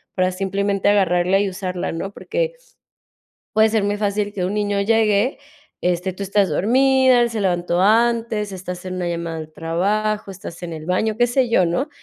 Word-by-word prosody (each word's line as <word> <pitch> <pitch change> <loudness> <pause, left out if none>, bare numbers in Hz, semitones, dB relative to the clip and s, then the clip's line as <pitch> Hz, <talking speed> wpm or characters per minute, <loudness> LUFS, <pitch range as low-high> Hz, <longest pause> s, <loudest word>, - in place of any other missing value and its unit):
para 185 0 +1
simplemente 195 +1 -1
agarrarla 190 -2 +3
y 200 -1 0
usarla, 185 -1 -4
¿no?, 190 +4 -5
porque - - -2 1.0
puede 220 0 +4
ser 215 -2 +1
muy 205 0 0
fácil 205 0 -1
que 185 - -2
un 190 +3 -2
niño 205 -1 0
llegue, 220 +2 +2 0.4
este, 180 +1 0
tú 195 - -7
estás 195 -1 +1
dormida, 260 - +4
él 235 - +1
se 225 - -3
levantó 175 -2 0
antes, 225 0 +2
estás 180 -1 -7
en 185 0 -5
una 180 -1 -2
llamada 170 -1 -4
del 155 0 -8
trabajo, 200 +6 -1
estás 180 -2 -9
en 170 - -5
el 155 - -8
baño, 210 +4 0
qué 240 +1 +3
sé 245 +1 +1
yo, 185 -6 +3
¿no?, 255 - -1
200 Hz, 185 wpm, -21 LUFS, 180-220 Hz, 1.0 s, puede